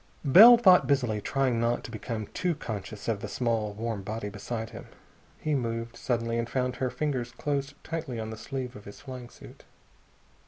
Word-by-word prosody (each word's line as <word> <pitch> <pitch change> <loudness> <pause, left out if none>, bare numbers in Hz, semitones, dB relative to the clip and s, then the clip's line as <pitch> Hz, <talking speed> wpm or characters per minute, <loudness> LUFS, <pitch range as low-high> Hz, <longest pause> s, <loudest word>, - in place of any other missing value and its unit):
Bell 220 - +10
thought 185 -6 +6
busily, 125 -7 +1
trying 130 0 0
not 115 +1 0
to - - -8
become 110 -1 -4
too 180 -2 0
conscious 110 -6 -6
of 110 -3 0
the 105 - -5
small 110 -2 -1
warm 110 -1 -3
body 105 +1 -4
beside 110 +2 -5
him. - - -10 0.5
He 155 - -1
moved, 115 -3 -2
suddenly, 115 -1 -1
and 115 0 -2
found 125 -1 -1
her 130 - 0
fingers 125 -2 -2
closed 140 0 -2
tightly 160 -7 -4
on 110 0 -4
the - - -5
sleeve 130 0 -5
of 105 - -11
his 100 - -11
flying 130 -3 -8
suit. - - -14
120 Hz, 185 wpm, -28 LUFS, 110-135 Hz, 0.5 s, Bell